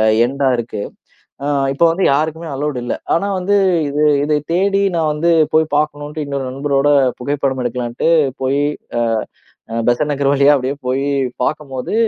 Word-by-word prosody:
அ 110 Hz, -, +3 dB, 0.2 s
எண்டா 135 Hz, +1 st, 0 dB
இருக்கு. 115 Hz, -3 st, -4 dB, 0.6 s
அ -, -, -2 dB, 0.3 s
இப்போ 170 Hz, -, +2 dB
வந்து 185 Hz, +2 st, -1 dB
யாருக்குமே 160 Hz, +3 st, -1 dB
அலவுட் 140 Hz, -2 st, -2 dB
இல்லை. -, -, -2 dB, 0.2 s
ஆனா 200 Hz, +4 st, -1 dB
வந்து 200 Hz, +2 st, +2 dB, 0.3 s
இது 150 Hz, +1 st, +1 dB, 0.2 s
இதை 150 Hz, 0 st, +1 dB
தேடி 195 Hz, +2 st, +2 dB
நான் 155 Hz, -2 st, +1 dB
வந்து 170 Hz, +3 st, +1 dB, 0.2 s
போய் 155 Hz, -1 st, +2 dB
பார்க்கணும்ட்டு, 150 Hz, 0 st, -2 dB
இன்னொரு 140 Hz, -2 st, -3 dB
நண்பரோட 140 Hz, +1 st, +1 dB, 0.3 s
புகைப்படம் 135 Hz, -1 st, -1 dB
எடுக்கலாம்ன்ட்டு 120 Hz, +5 st, -1 dB, 0.3 s
போய் 135 Hz, +2 st, +1 dB, 0.4 s
அ -, -, +2 dB, 0.9 s
பெசன் 120 Hz, +5 st, +1 dB
நகர் 140 Hz, 0 st, 0 dB
வழியா 140 Hz, +1 st, +5 dB
அப்படியே 130 Hz, +2 st, -2 dB
போயி 135 Hz, +2 st, 0 dB, 0.3 s
பார்க்கும்போது, 135 Hz, -1 st, -3 dB
145 Hz, 150 wpm, -17 LUFS, 135-155 Hz, 0.9 s, வழியா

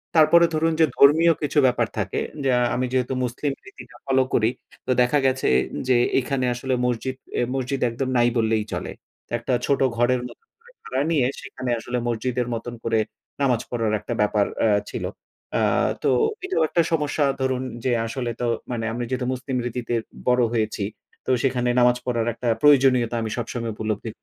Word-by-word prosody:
তারপরে 165 Hz, +2 st, +6 dB
ধরুন 160 Hz, +1 st, +1 dB
যে 160 Hz, -, +7 dB
ধর্মীয় 160 Hz, +4 st, +6 dB
কিছু 150 Hz, 0 st, -2 dB
ব্যাপার 125 Hz, -, +1 dB
থাকে -, -, -1 dB, 0.2 s
যে 135 Hz, -, +1 dB, 0.3 s
আমি 130 Hz, +1 st, 0 dB
যেহেতু 130 Hz, 0 st, 0 dB
মুসলিম 125 Hz, +4 st, -2 dB
রীতিটা 410 Hz, 0 st, -13 dB
ফলো 130 Hz, -1 st, +3 dB
করি 110 Hz, 0 st, +3 dB, 0.4 s
তো -, -, 0 dB
দেখা 125 Hz, +4 st, +3 dB
গেছে 130 Hz, 0 st, +1 dB, 0.4 s
যে 130 Hz, -, +4 dB, 0.2 s
এখানে 130 Hz, 0 st, -1 dB
আসলে 130 Hz, +2 st, -3 dB
মসজিদ 125 Hz, +2 st, -1 dB, 0.2 s
এ -, -, +2 dB
মসজিদ 135 Hz, +1 st, -2 dB
একদম 130 Hz, +3 st, -3 dB
নাই 120 Hz, 0 st, +4 dB
বললেই 110 Hz, -1 st, +1 dB
চলে। -, -, -4 dB, 0.4 s
তো -, -, -39 dB
একটা 120 Hz, +2 st, -2 dB
ছোট 140 Hz, -, +1 dB, 0.2 s
ঘরের 120 Hz, +1 st, +2 dB
মত -, -, -14 dB, 0.2 s
করে 480 Hz, +1 st, -21 dB
ভাড়া 130 Hz, +1 st, -2 dB
নিয়ে 145 Hz, -6 st, +3 dB, 0.2 s
সেখানে 130 Hz, -, -6 dB
আসলে 125 Hz, +2 st, -3 dB
মসজিদের 120 Hz, +1 st, -1 dB
মতন 120 Hz, +1 st, -5 dB
করে 115 Hz, -1 st, +1 dB, 0.4 s
নামাজ 125 Hz, -4 st, +2 dB
পড়ার 115 Hz, -3 st, -1 dB
একটা -, -, -5 dB
ব্যাপার 105 Hz, -1 st, +2 dB, 0.2 s
আ -, -, +4 dB, 0.2 s
ছিল। -, -, -4 dB, 0.5 s
অ্যা -, -, +1 dB, 0.4 s
তো -, -, +3 dB, 0.4 s
এটাও 380 Hz, -, +1 dB
একটা 170 Hz, -, +3 dB
সমস্যা 150 Hz, -2 st, +1 dB, 0.2 s
ধরুন 130 Hz, -1 st, 0 dB, 0.2 s
যে 130 Hz, -, +1 dB, 0.2 s
আসলে 120 Hz, 0 st, -3 dB
তো -, -, 0 dB, 0.3 s
মানে 115 Hz, -2 st, -2 dB
আমি 120 Hz, -, -3 dB
যেহেতু 130 Hz, -1 st, -2 dB
মুসলিম 130 Hz, 0 st, -3 dB
রীতিতে 120 Hz, 0 st, -3 dB, 0.3 s
বড় 125 Hz, 0 st, +4 dB
হয়েছি, 110 Hz, -3 st, -1 dB, 0.4 s
তো -, -, -5 dB
সেখানে 125 Hz, -2 st, +1 dB
নামাজ 125 Hz, 0 st, +4 dB
পড়ার 120 Hz, -2 st, -1 dB
একটা 120 Hz, -, -5 dB
প্রয়োজনীয়তা 130 Hz, -5 st, +4 dB
আমি 110 Hz, -, -3 dB
সবসময় 115 Hz, -1 st, -3 dB
উপলব্ধি। 110 Hz, +1 st, -3 dB
125 Hz, 175 wpm, -23 LUFS, 120-135 Hz, 0.5 s, যে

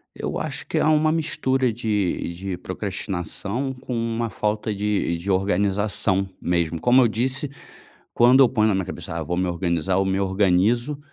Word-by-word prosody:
Eu -, -, -4 dB
acho -, -, -3 dB
que -, -, -2 dB
há -, -, +3 dB
uma 155 Hz, 0 st, +3 dB
mistura 130 Hz, -6 st, 0 dB
de 105 Hz, -6 st, -1 dB
de 95 Hz, 0 st, -4 dB
procrastinação, 100 Hz, -, -4 dB
com 125 Hz, -1 st, -6 dB
uma 115 Hz, 0 st, -1 dB
falta 105 Hz, 0 st, -2 dB
de 100 Hz, -4 st, -1 dB
de 95 Hz, +4 st, -3 dB
organização 95 Hz, 0 st, +1 dB
mesmo, 85 Hz, -2 st, -1 dB
como 125 Hz, +8 st, +5 dB
eu 120 Hz, -, +5 dB
disse, 130 Hz, +6 st, -1 dB, 0.7 s
quando 125 Hz, +3 st, +6 dB
eu 125 Hz, -, +6 dB
ponho 110 Hz, -3 st, +2 dB
na 100 Hz, -, +2 dB
minha 95 Hz, -1 st, -1 dB
cabeça: 90 Hz, -, -6 dB
"Ah, 85 Hz, -, -3 dB
vou 85 Hz, +3 st, -3 dB
me 90 Hz, -, 0 dB
organizar", 85 Hz, +1 st, 0 dB
eu 95 Hz, -, +2 dB
me 95 Hz, 0 st, 0 dB
organizo, 100 Hz, +8 st, +1 dB
100 Hz, 175 wpm, -23 LUFS, 95-120 Hz, 0.7 s, quando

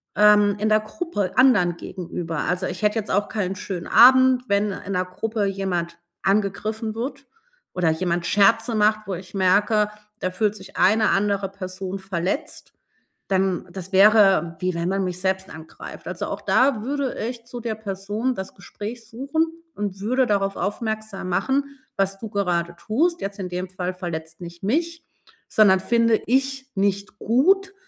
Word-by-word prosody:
ähm, 210 Hz, -1 st, +5 dB
in 215 Hz, -, +1 dB
der 215 Hz, 0 st, +5 dB
Gruppe 215 Hz, -, -3 dB
anderen 205 Hz, -10 st, +4 dB
gegenüber. 165 Hz, -3 st, -5 dB
Also, 180 Hz, +1 st, -1 dB
ich -, -, -6 dB
hätte 210 Hz, +2 st, +2 dB
jetzt 205 Hz, -, -5 dB
auch 205 Hz, +2 st, +1 dB
keinen 195 Hz, -3 st, -2 dB
schönen 185 Hz, -2 st, -5 dB
Abend, 260 Hz, +1 st, +6 dB
wenn 200 Hz, 0 st, +2 dB
in 195 Hz, -, -7 dB
'ner 180 Hz, -1 st, 0 dB
Gruppe 215 Hz, +3 st, -2 dB
jemand 180 Hz, -4 st, -2 dB, 0.3 s
angegriffen 215 Hz, +2 st, -1 dB
wird 270 Hz, +4 st, -5 dB, 0.5 s
oder 180 Hz, -3 st, +1 dB
jemand 175 Hz, +1 st, -1 dB
Scherze 225 Hz, +3 st, +3 dB
macht, 215 Hz, 0 st, +3 dB
wo 195 Hz, -, -2 dB
ich 180 Hz, +2 st, -11 dB
merke: 205 Hz, +3 st, +3 dB, 0.3 s
„Da 185 Hz, -, -2 dB
fühlt 210 Hz, +2 st, 0 dB
sich 190 Hz, -2 st, -12 dB
eine 215 Hz, +3 st, +4 dB
andere 200 Hz, -1 st, +1 dB
Person 190 Hz, 0 st, -6 dB
verletzt“, 190 Hz, -, -4 dB, 0.6 s
dann 190 Hz, -2 st, 0 dB
das 190 Hz, -1 st, -7 dB
wäre, 195 Hz, -4 st, +5 dB
wie 185 Hz, -1 st, -1 dB
wenn 170 Hz, +1 st, -1 dB
man 195 Hz, 0 st, 0 dB
mich 180 Hz, 0 st, -4 dB
selbst 190 Hz, 0 st, -1 dB
angreift. 160 Hz, 0 st, -10 dB
Also, -, -, -4 dB
auch -, -, -5 dB
da 255 Hz, -5 st, +2 dB
würde 275 Hz, 0 st, -2 dB
ich 235 Hz, -1 st, -7 dB
zu 245 Hz, 0 st, -7 dB
der 225 Hz, -2 st, -3 dB
Person 210 Hz, +4 st, -3 dB
das 190 Hz, 0 st, -7 dB
Gespräch 220 Hz, +3 st, -8 dB
suchen 280 Hz, +7 st, -1 dB, 0.3 s
und 200 Hz, -2 st, -4 dB
würde 255 Hz, +5 st, +1 dB
darauf 195 Hz, -1 st, 0 dB
aufmerksam 215 Hz, 0 st, -3 dB
machen: 270 Hz, +9 st, -1 dB, 0.2 s
„Was 195 Hz, 0 st, 0 dB
du 220 Hz, -, -6 dB
gerade 175 Hz, -4 st, -1 dB
tust, 325 Hz, -, 0 dB
jetzt 200 Hz, +1 st, -5 dB
in 185 Hz, -2 st, -4 dB
dem 180 Hz, +1 st, -4 dB
Fall, 185 Hz, 0 st, -4 dB
verletzt 160 Hz, -2 st, -6 dB
nicht 170 Hz, 0 st, -10 dB
mich, 330 Hz, -, -1 dB, 0.5 s
sondern 195 Hz, -3 st, +5 dB
finde 230 Hz, +1 st, +2 dB
ich 270 Hz, +2 st, 0 dB
nicht 200 Hz, +1 st, -1 dB
gut 385 Hz, -, +2 dB
200 Hz, 165 wpm, -23 LUFS, 185-225 Hz, 0.6 s, Abend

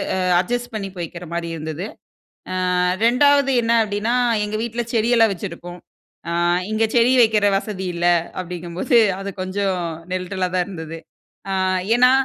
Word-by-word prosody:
அ -, -, -1 dB, 0.2 s
adjust 245 Hz, +6 st, -3 dB
பண்ணி 200 Hz, -2 st, -4 dB
போய்கிற 170 Hz, +1 st, -6 dB
மாரி 170 Hz, 0 st, -3 dB
இருந்தது. 160 Hz, +4 st, -5 dB, 0.9 s
ஆ -, -, +1 dB, 0.3 s
2 280 Hz, +3 st, +4 dB
என்ன 230 Hz, 0 st, 0 dB
அப்டினா, 210 Hz, +3 st, -1 dB, 0.3 s
எங்க 210 Hz, +1 st, -4 dB
வீட்ல்ல 235 Hz, 0 st, -3 dB
செடியெல்லாம் 225 Hz, -1 st, +3 dB
வச்சிருப்போம். 175 Hz, -1 st, -8 dB, 0.5 s
ஆ -, -, -2 dB, 0.4 s
இங்க 220 Hz, +1 st, +1 dB
செடி 235 Hz, +2 st, +5 dB
வைக்கிற 215 Hz, -2 st, +3 dB
வசதி 195 Hz, -2 st, -5 dB
இல்ல 175 Hz, 0 st, -1 dB, 0.4 s
அப்டிங்கும்போது 180 Hz, -, -1 dB, 0.2 s
அது 195 Hz, -, -5 dB
கொஞ்சம் 190 Hz, 0 st, -1 dB, 0.3 s
நெருடல்லா 185 Hz, 0 st, -2 dB
தான் 180 Hz, -, +1 dB
இருந்தது. 165 Hz, -4 st, -7 dB, 0.5 s
ஆ -, -, 0 dB, 0.4 s
ஏனா, 250 Hz, +1 st, +5 dB
200 Hz, 135 wpm, -21 LUFS, 175-230 Hz, 0.9 s, செடி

